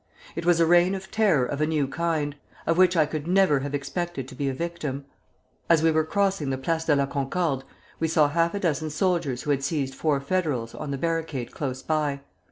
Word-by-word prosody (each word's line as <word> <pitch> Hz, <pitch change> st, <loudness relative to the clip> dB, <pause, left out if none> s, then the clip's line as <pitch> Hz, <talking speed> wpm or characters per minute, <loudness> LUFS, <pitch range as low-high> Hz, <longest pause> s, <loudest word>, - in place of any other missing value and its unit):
It 170 Hz, +1 st, -4 dB
was 175 Hz, -1 st, +4 dB
a 165 Hz, -, +5 dB
reign 175 Hz, +3 st, +4 dB
of 190 Hz, 0 st, -8 dB
terror 190 Hz, -, +3 dB
of 145 Hz, +3 st, -3 dB
a 155 Hz, -, +2 dB
new 150 Hz, -3 st, +1 dB
kind, 155 Hz, -1 st, -1 dB, 0.3 s
of 165 Hz, -, +2 dB
which 180 Hz, 0 st, +4 dB
I 155 Hz, -, +5 dB
could 155 Hz, 0 st, -5 dB
never 185 Hz, -6 st, +4 dB
have 145 Hz, +1 st, -3 dB
expected 145 Hz, 0 st, -4 dB
to -, -, -10 dB
be 140 Hz, -2 st, -2 dB
a -, -, -2 dB
victim. 150 Hz, -4 st, -4 dB, 0.6 s
As 165 Hz, -2 st, +5 dB
we 165 Hz, -, +5 dB
were 160 Hz, 0 st, +2 dB
crossing 195 Hz, -3 st, 0 dB
the 130 Hz, -, -1 dB
Place 160 Hz, +5 st, -1 dB
de 150 Hz, -, +4 dB
la 140 Hz, -1 st, +2 dB
Concorde 140 Hz, +1 st, -1 dB, 0.4 s
we 165 Hz, -, +1 dB
saw 155 Hz, -2 st, +4 dB
half 165 Hz, +4 st, +1 dB
a -, -, -1 dB
dozen 155 Hz, -4 st, 0 dB
soldiers 155 Hz, -5 st, 0 dB
who 150 Hz, -, 0 dB
had 135 Hz, -1 st, 0 dB
seized 140 Hz, -2 st, -1 dB
four 145 Hz, 0 st, 0 dB
Federals 140 Hz, -7 st, -1 dB
on 155 Hz, -, -6 dB
the 140 Hz, -, -2 dB
barricade 160 Hz, -5 st, -2 dB
close 130 Hz, -3 st, -4 dB
by. 150 Hz, -3 st, 0 dB
155 Hz, 220 wpm, -25 LUFS, 140-170 Hz, 0.6 s, a